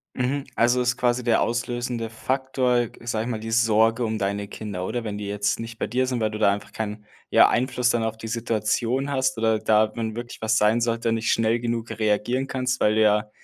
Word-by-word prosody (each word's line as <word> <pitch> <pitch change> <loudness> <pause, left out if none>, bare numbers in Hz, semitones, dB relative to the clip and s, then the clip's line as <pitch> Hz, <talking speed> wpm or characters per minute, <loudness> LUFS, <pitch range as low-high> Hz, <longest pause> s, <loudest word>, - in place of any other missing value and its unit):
Mhm, 135 +2 -1
also 120 +2 +3
ist 125 0 +1
quasi 125 0 +1
der 115 -2 +2
auslösende 120 0 -2
Faktor, 125 0 0
g - - -17
sage 110 -2 -1
ich 125 - -4
mal, 110 - -2
die 115 - -6
Sorge 115 +1 +3
um 110 -1 -2
deine 100 0 -2
Kinder, 100 -5 -5
oder? 120 +1 -3
Wenn 105 -2 -4
die 105 - -5
jetzt 100 +1 -1
nicht 115 0 -7
bei - - -1
dir 130 +1 0
sind, 125 -2 -2
weil 110 -1 +1
du 105 - -5
da 105 -2 +4
einfach 100 - -6
keinen, 105 -1 -5 0.3
ja, - - +6
Einfluss 125 0 +1
dann 120 -1 +1
auf 110 0 -2
die 115 - -8
Situation 115 +4 -1
hast 130 -2 0
oder 110 -1 +2
da, 110 0 +2
wenn 110 -1 -3
wirklich 120 0 -7
was 110 0 +1
sein 110 +3 +3
sollte 115 0 0
und 115 - +1
nicht 115 0 -1
schnell 115 +1 +2
genug 115 -1 -3
reagieren 110 +4 0
kannst, 130 -1 -2
weil 105 - +3
du 110 - +3
ja, 105 0 +2
115 Hz, 230 wpm, -24 LUFS, 110-120 Hz, 0.3 s, ja